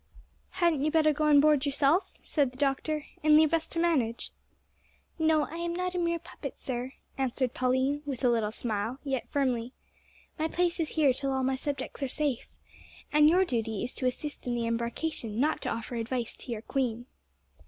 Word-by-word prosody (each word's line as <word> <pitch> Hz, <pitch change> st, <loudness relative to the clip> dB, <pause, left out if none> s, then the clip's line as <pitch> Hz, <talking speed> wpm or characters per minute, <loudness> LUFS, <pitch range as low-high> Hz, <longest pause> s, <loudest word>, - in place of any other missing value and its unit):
"Hadn't 340 Hz, -6 st, +2 dB
you 305 Hz, -, +2 dB
better 310 Hz, -1 st, +4 dB
go 305 Hz, +1 st, 0 dB
on 295 Hz, -1 st, +7 dB
board 295 Hz, -2 st, +4 dB
yourself?" 285 Hz, +5 st, +2 dB
said 285 Hz, -4 st, +1 dB
the 255 Hz, -, -16 dB
doctor, 290 Hz, +2 st, 0 dB, 0.2 s
"and 305 Hz, 0 st, +6 dB
leave 315 Hz, 0 st, +4 dB
us 325 Hz, -1 st, +1 dB
to -, -, -7 dB
manage." 285 Hz, -9 st, +1 dB, 0.9 s
"No, 315 Hz, -1 st, +3 dB
I 325 Hz, -, -6 dB
am 340 Hz, 0 st, -2 dB
not 365 Hz, 0 st, -2 dB
a 360 Hz, -, -1 dB
mere 340 Hz, -1 st, +1 dB
puppet, 325 Hz, -4 st, -8 dB
sir," 255 Hz, 0 st, -4 dB, 0.3 s
answered 255 Hz, -1 st, 0 dB
Pauline, 260 Hz, +3 st, +1 dB
with 275 Hz, -3 st, -5 dB
a 250 Hz, -, +5 dB
little 225 Hz, -3 st, +1 dB
smile, 225 Hz, +1 st, -2 dB
yet 270 Hz, -4 st, -2 dB
firmly. 255 Hz, -3 st, 0 dB, 0.7 s
"My 315 Hz, -, +1 dB
place 345 Hz, +1 st, 0 dB
is 320 Hz, -, 0 dB
here 290 Hz, -5 st, +4 dB
till 275 Hz, +2 st, -2 dB
all 265 Hz, 0 st, 0 dB
my 265 Hz, +1 st, +1 dB
subjects 275 Hz, +1 st, -4 dB
are 275 Hz, -, 0 dB
safe! 285 Hz, -3 st, -1 dB, 0.7 s
And 300 Hz, 0 st, +7 dB
your 370 Hz, +3 st, +4 dB
duty 225 Hz, -, -2 dB
is 245 Hz, -, -4 dB
to 255 Hz, -, -1 dB
assist 290 Hz, +2 st, -4 dB
in 240 Hz, -, 0 dB
the 235 Hz, -1 st, -1 dB
embarkation, 235 Hz, 0 st, -2 dB
not 305 Hz, +4 st, +1 dB
to -, -, -2 dB
offer 230 Hz, +2 st, -4 dB
advice 235 Hz, +1 st, -2 dB
to -, -, -7 dB
your 225 Hz, -2 st, -4 dB
queen!" 245 Hz, -3 st, -1 dB
275 Hz, 195 wpm, -29 LUFS, 245-310 Hz, 0.9 s, on